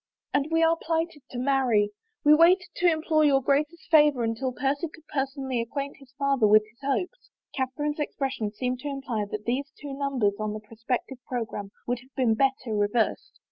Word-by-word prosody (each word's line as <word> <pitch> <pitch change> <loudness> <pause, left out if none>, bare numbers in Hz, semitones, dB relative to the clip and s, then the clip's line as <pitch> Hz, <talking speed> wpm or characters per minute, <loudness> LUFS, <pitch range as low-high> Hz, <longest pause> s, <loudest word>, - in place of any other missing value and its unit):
" - - -55
And 280 +1 +2
we 325 0 +3
are 325 0 +4
plighted 325 -2 -2
to 250 - -7
marry. 250 -6 +2 0.3
We 295 - +7
waited 355 +4 +5
to 350 -1 +4
implore 315 -1 +2
your 280 -2 +5
Grace's 290 +5 0
favor 295 -6 +5
until 230 +3 -1
Percy 275 +5 -1
could 315 0 -17
personally 270 -3 -2
acquaint 280 +4 -4
his 270 -2 -17
father 275 -5 +3
with 215 +1 +6
his 220 +2 -26
hopes." 355 - -2 0.3
Catherine's 290 +3 -2
expression 270 -7 -2
seemed 250 +3 -2
to 290 - -6
im 275 -1 -4
ply 225 -6 -2
that 210 0 -5
these 270 +4 -1
two 290 - -7
nimibers 260 -7 0
on 215 -1 -2
the 215 - -5
prospective 230 +4 -4
programme 225 -5 -4 0.2
would 245 0 -1
have 260 +2 -21
been 250 -5 +3
better 260 -2 0
reversed. 210 +2 0
270 Hz, 190 wpm, -27 LUFS, 235-295 Hz, 0.3 s, We